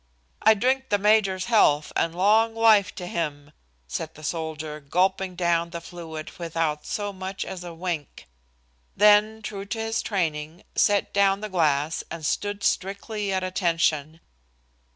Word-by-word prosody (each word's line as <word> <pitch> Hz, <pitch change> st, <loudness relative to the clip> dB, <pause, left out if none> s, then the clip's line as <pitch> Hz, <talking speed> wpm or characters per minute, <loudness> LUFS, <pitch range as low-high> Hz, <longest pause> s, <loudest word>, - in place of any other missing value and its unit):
"I 220 Hz, -, +6 dB
drink 260 Hz, +5 st, 0 dB
the 205 Hz, -, +3 dB
major's 200 Hz, -2 st, +2 dB
health 155 Hz, -11 st, +3 dB
and 165 Hz, 0 st, 0 dB
long 220 Hz, +5 st, +3 dB
life 220 Hz, -3 st, +4 dB
to 180 Hz, -, -6 dB
him," 150 Hz, -4 st, -4 dB, 0.4 s
said 160 Hz, -, -5 dB
the 155 Hz, -, -13 dB
soldier, 155 Hz, -1 st, -4 dB
gulping 185 Hz, +5 st, 0 dB
down 170 Hz, -1 st, +1 dB
the 170 Hz, 0 st, -6 dB
fluid 165 Hz, -2 st, -8 dB
without 165 Hz, -3 st, -2 dB
so 205 Hz, -1 st, -3 dB
much 190 Hz, +1 st, -5 dB
as 180 Hz, -2 st, -7 dB
a 175 Hz, -, -7 dB
wink. 165 Hz, -, -5 dB, 0.7 s
Then, 210 Hz, +2 st, +5 dB
true 200 Hz, -2 st, -5 dB
to 225 Hz, +3 st, -4 dB
his 225 Hz, 0 st, -1 dB
training, 160 Hz, -3 st, -3 dB
set 205 Hz, -1 st, +2 dB
down 200 Hz, 0 st, +3 dB
the 215 Hz, -, -4 dB
glass 155 Hz, -4 st, +1 dB
and 165 Hz, -2 st, -6 dB
stood 205 Hz, +4 st, -2 dB
strictly 200 Hz, +1 st, -1 dB
at 190 Hz, -1 st, 0 dB
attention. 165 Hz, -4 st, 0 dB
185 Hz, 150 wpm, -25 LUFS, 160-205 Hz, 0.7 s, I